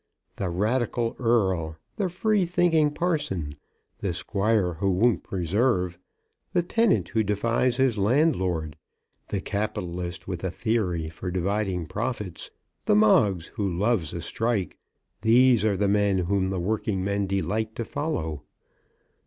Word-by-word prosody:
The 95 - -2
radical 115 +5 0
Earl, 95 -10 +1 0.2
the 195 -3 0
free 205 +3 +1
thinking 165 -3 +3
parson, 145 - -2 0.5
the 95 -4 -2
squire 100 0 0
who 90 +4 -1
won't 95 0 +3
preserve, 90 -1 0 0.5
the 175 - +2
tenant 230 +6 +2
who 110 - +1
defies 115 +4 +1
his 130 -5 +2
landlord, 95 - +1 0.5
the 100 - -2
capitalist 90 -5 -4
with 90 -2 -4
a 95 - 0
theory 95 -4 -1
for 80 +3 -6
dividing 95 0 -1
profits, 105 -1 -4 0.4
the - - +4
Moggs 105 -4 +4
who 95 -5 -1
loves 100 -6 +1
a 85 - -5
strike, 110 -4 -2 0.4
these 120 0 +5
are 105 -3 +2
the 100 +1 +1
men 100 -1 +2
whom 95 +1 0
the 95 -1 -2
working 100 0 -1
men 100 0 0
delight 110 +3 -1
to 115 - -3
follow. 80 - -3
100 Hz, 135 wpm, -26 LUFS, 90-120 Hz, 0.5 s, these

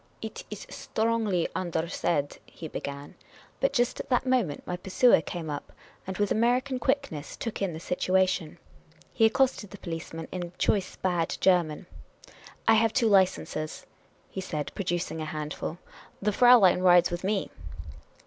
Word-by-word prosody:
" - - -35
It - - -6
is - - -7
strongly 220 -6 0
undersaid," 165 -4 -1
he 165 - -9
began, 140 -1 -6 0.5
but - - +2
just 245 -1 +1
at - - -6
that 255 0 +2
moment 245 - 0
my 180 - -3
pursuer 190 +3 +4
came 165 0 -6
up, 145 -1 -5 0.4
and, 190 - -4
with 205 -1 0
American 250 +4 +1
quickness, 260 - -2
took 230 -3 -5
in 195 -3 0
the - - -6
situa 185 +2 +2
tion. 175 -4 -3 0.6
He 225 - +5
accosted 255 -4 +1
the 205 - -10
policeman 165 -2 -6
in 175 -1 -5
choice 195 -2 0
bad 175 -3 -1
German. 175 -3 +2 0.3
' - - -21
' - - -20
I 225 - +7
have 225 0 +3
two 230 -2 +3
licenses, 185 -5 +1 0.2
' - - -34
' - - -35
he 190 - -4
said, 155 -5 -4
producing 175 -4 -2
a - - -3
handful. 155 +1 -5
' - - -19
' - - -30
The 210 +1 +1
Fraulein 240 -6 +6
rides 180 -2 +5
with 175 +1 -4
me. 195 0 -1
185 Hz, 175 wpm, -28 LUFS, 165-225 Hz, 0.6 s, I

